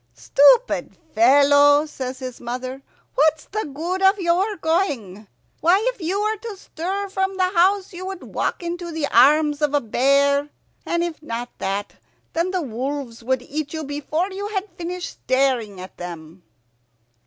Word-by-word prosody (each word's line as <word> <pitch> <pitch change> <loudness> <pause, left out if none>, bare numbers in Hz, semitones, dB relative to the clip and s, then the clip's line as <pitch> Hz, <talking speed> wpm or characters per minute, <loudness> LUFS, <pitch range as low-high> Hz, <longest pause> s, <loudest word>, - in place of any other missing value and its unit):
"Stupid 290 - +3 0.2
fellow," 285 +5 +6
says 260 -4 -6
his 255 -2 -7
mother, 255 +2 -5 0.3
"what's 310 +1 +2
the 425 -6 -4
good 345 +7 -3
of 385 +1 +5
your 375 +3 +1
going? 275 - -1 0.3
Why, 345 +4 +4 0.2
if 455 - -18
you 360 +5 -1
were 430 +1 0
to 425 -1 -8
stir 385 +3 -4
from 385 0 -1
the 370 -1 +2
house 380 +3 +3
you 370 +2 -6
would 385 -2 -6
walk - - -2
into 345 0 -4
the 320 -2 -1
arms 295 +2 +5
of 295 -1 +1
a - - +4
bear; 280 +4 +2 0.4
and 340 0 +1
if 340 -3 -4
not 240 -4 -5
that, 195 +1 -3 0.4
then 335 +2 0
the 370 -2 -1
wolves 255 -1 -5
would 260 +1 0
eat 295 +2 -5
you 315 -1 -4
before 300 +6 -2
you 400 +2 -4
had 410 -1 -3
finished 355 0 -5
staring 255 -7 +1
at 185 +1 -10
them." 170 0 -9
300 Hz, 160 wpm, -22 LUFS, 260-370 Hz, 0.4 s, fellow